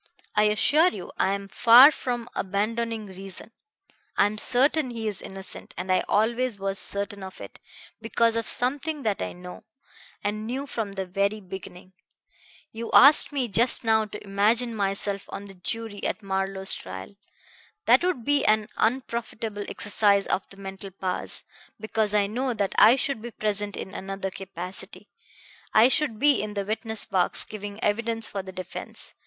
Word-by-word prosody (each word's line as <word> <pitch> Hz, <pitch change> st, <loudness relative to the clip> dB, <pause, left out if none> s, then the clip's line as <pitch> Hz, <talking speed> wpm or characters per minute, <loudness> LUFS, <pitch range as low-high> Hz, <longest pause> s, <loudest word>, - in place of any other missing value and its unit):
"I 210 Hz, 0 st, +4 dB
assure 285 Hz, -, +4 dB
you 190 Hz, -, -8 dB
I 195 Hz, -, +2 dB
am 200 Hz, 0 st, -7 dB
far 240 Hz, +7 st, +8 dB
from 245 Hz, -4 st, -4 dB
abandoning 220 Hz, +3 st, -2 dB
reason. 195 Hz, +3 st, -9 dB, 0.7 s
I -, -, +5 dB
am 210 Hz, +1 st, +1 dB
certain 270 Hz, +4 st, +3 dB
he 230 Hz, -2 st, -4 dB
is 205 Hz, -3 st, -4 dB
innocent, 190 Hz, 0 st, -8 dB
and 185 Hz, -, -3 dB
I 185 Hz, -, +3 dB
always 235 Hz, +2 st, +1 dB
was 195 Hz, 0 st, -2 dB
certain 200 Hz, 0 st, -3 dB
of 190 Hz, 0 st, -9 dB
it, -, -, -10 dB, 0.4 s
because 230 Hz, 0 st, +1 dB
of 230 Hz, -1 st, -1 dB
something 285 Hz, +4 st, -1 dB
that 210 Hz, -3 st, -1 dB
I -, -, -3 dB
know, 180 Hz, 0 st, -10 dB, 0.6 s
and 215 Hz, +1 st, -2 dB
knew 265 Hz, +4 st, -3 dB
from 225 Hz, -7 st, -4 dB
the 195 Hz, -1 st, -3 dB
very 200 Hz, +3 st, -1 dB
beginning. 185 Hz, -1 st, -10 dB, 0.8 s
You 230 Hz, +1 st, -6 dB
asked 285 Hz, +3 st, +8 dB
me 270 Hz, -4 st, -1 dB
just 235 Hz, +4 st, +3 dB
now 220 Hz, -1 st, +3 dB
to 210 Hz, -, -9 dB
imagine 220 Hz, +4 st, +2 dB
myself 200 Hz, 0 st, -1 dB
on 200 Hz, -, -7 dB
the 195 Hz, -, -11 dB
jury 205 Hz, +3 st, -4 dB
at 215 Hz, -, -2 dB
Marlowe's 195 Hz, 0 st, -2 dB
trial. 95 Hz, -, -8 dB, 0.7 s
That 255 Hz, -, +5 dB
would 355 Hz, -11 st, -1 dB
be 290 Hz, -1 st, +3 dB
an 215 Hz, 0 st, +2 dB
unprofitable 230 Hz, -4 st, -2 dB
exercise 205 Hz, -2 st, +2 dB
of 185 Hz, -, -2 dB
the 195 Hz, -, -12 dB
mental 195 Hz, 0 st, -8 dB
powers, 185 Hz, -1 st, -3 dB, 0.3 s
because 215 Hz, -1 st, 0 dB
I 205 Hz, -1 st, +4 dB
know 245 Hz, +4 st, -2 dB
that 200 Hz, -2 st, -1 dB
I 230 Hz, -, +8 dB
should 270 Hz, -3 st, -2 dB
be 240 Hz, -, -6 dB
present 205 Hz, -2 st, -2 dB
in 190 Hz, -, -7 dB
another 195 Hz, 0 st, -5 dB
capacity. 190 Hz, +2 st, -5 dB, 0.7 s
I 225 Hz, +3 st, +7 dB
should 270 Hz, -5 st, 0 dB
be 285 Hz, +3 st, +4 dB
in 210 Hz, 0 st, -5 dB
the 200 Hz, -1 st, -2 dB
witness 220 Hz, +1 st, +1 dB
box, 185 Hz, -2 st, 0 dB
giving 205 Hz, -1 st, -8 dB
evidence 225 Hz, +2 st, 0 dB
for 200 Hz, -, -4 dB
the 190 Hz, 0 st, -9 dB
defense. 185 Hz, -1 st, -5 dB
210 Hz, 165 wpm, -26 LUFS, 195-230 Hz, 0.8 s, far